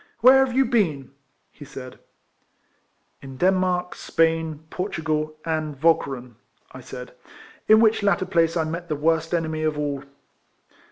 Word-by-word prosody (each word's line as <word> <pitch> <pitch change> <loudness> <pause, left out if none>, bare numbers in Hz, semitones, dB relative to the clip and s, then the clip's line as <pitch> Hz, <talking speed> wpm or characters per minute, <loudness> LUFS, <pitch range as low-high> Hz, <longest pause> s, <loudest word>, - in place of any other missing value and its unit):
" - - -42
Where 265 +3 +7
have 255 -2 -3
you 270 - +5
been?" 165 - 0 0.4
he 150 - -13
said. 135 -3 -10 0.6
'* - - -44
In 135 -1 -10
Denmark, 180 +1 +1
Spain, 160 -2 0
Portugal, 155 -4 -2
and 155 -3 -3
Walcheren," 135 -7 0 0.3
I - - -10
said, 125 -1 -9 0.3
" - - -21
in 215 0 +7
which 225 -1 +3
latter 200 -1 +1
place 170 -2 +1
I 165 - +1
met 170 +2 -5
the 155 - 0
worst 160 +2 0
enemy 160 -2 -1
of 155 -1 -1
all." 145 -2 -3
160 Hz, 155 wpm, -23 LUFS, 150-180 Hz, 0.6 s, Where